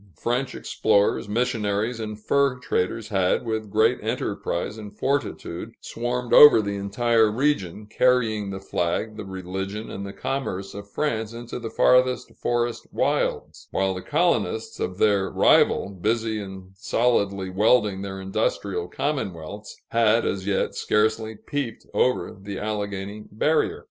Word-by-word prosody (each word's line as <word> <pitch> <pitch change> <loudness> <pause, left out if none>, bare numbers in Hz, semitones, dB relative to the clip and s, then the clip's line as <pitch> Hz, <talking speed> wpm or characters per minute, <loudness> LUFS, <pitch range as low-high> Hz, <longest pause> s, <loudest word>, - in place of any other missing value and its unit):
French 125 - -1
explorers, 100 0 +1
missionaries, 110 -1 0
and 110 -1 -5
fur 140 +3 +2
traders 110 -2 -2
had, 95 +2 +1
with 110 -2 -3
great 110 +4 +3
enterprise 90 +4 -2
and 105 -2 -10
fortitude, 115 -7 -2
swarmed 120 +1 -3
over 150 -6 +10
the 100 -1 -2
entire 110 +3 +2
region, 105 - 0
carrying 110 -2 +2
the 95 0 -5
flag, 95 +4 -2
the 110 - -6
religion, 95 +2 -5
and 100 - -5
the 100 - -6
commerce 100 -7 -4
of 100 0 -9
France 110 -4 -2
into 120 +1 -6
the 115 -2 -5
farthest 125 +1 +3
forest 120 -1 -1
wilds; - - -1
while 95 0 0
the 90 - -6
colonists 145 - 0
of 90 0 -3
their 100 -2 +3
rival, - - +4
busy 110 +3 -1
in 95 -1 -9
solidly 100 -3 0
welding 105 0 +3
their 95 -1 -5
industrial 95 -2 -2
commonwealths, 100 - -4
had 115 0 +3
as 95 0 -2
yet 100 - 0
scarcely 110 +1 0
peeped 135 0 -5
over 125 -3 +1
the 100 0 -6
Alleghany 105 -1 -4
barrier. 150 +10 +1
105 Hz, 135 wpm, -24 LUFS, 100-120 Hz, -, over